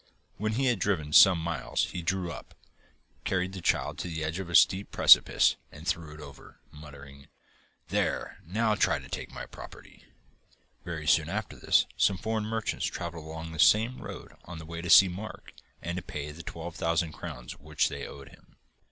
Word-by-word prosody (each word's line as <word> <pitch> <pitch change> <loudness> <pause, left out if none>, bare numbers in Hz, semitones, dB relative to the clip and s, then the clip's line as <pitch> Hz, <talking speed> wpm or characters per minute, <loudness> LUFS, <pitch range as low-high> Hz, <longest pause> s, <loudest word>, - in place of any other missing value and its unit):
When 110 +2 -1
he 135 +4 0
had 120 -5 +2
driven 80 -7 -1
some 95 +1 +8
miles 80 -4 -2
he 90 - -4
drew 90 +1 -2
up, 65 - -10 0.7
carried 95 0 -1
the 95 - -7
child - - 0
to - - -4
the 80 -2 -4
edge 80 +4 -3
of 95 -2 -6
a 85 - -2
steep 85 +7 +4
precipice - - +6
and 80 +3 -11
threw 85 -4 -2
it - - -13
over, 70 -2 -13
muttering, 70 -2 -13 0.6
'There, - - -1
now 110 +6 0
try - - +2
to - - -10
take - - -6
my - - -8
property!' - - -13 0.8
Very 80 -3 -6
soon 80 0 +3
after 105 +2 -4
this - - +3
some 95 - +3
foreign 110 +2 -2
merchants 110 0 -2
travelled 85 -2 -6
along 80 +1 -7
that 80 -1 -1
same 115 +7 +4
road - - -9
on 90 0 -8
the 80 - -9
way 85 +1 -6
to 85 - -6
see 95 - +9
Mark 95 +5 -8 0.3
and 85 +2 -3
to - - -3
pay 75 -2 -6
the 80 +3 -10
twelve 85 0 -7
thousand 85 0 0
crowns 75 -7 -8
which 75 +1 0
they - - -6
owed 70 -1 -11
him. - - -21
85 Hz, 190 wpm, -28 LUFS, 80-95 Hz, 0.8 s, see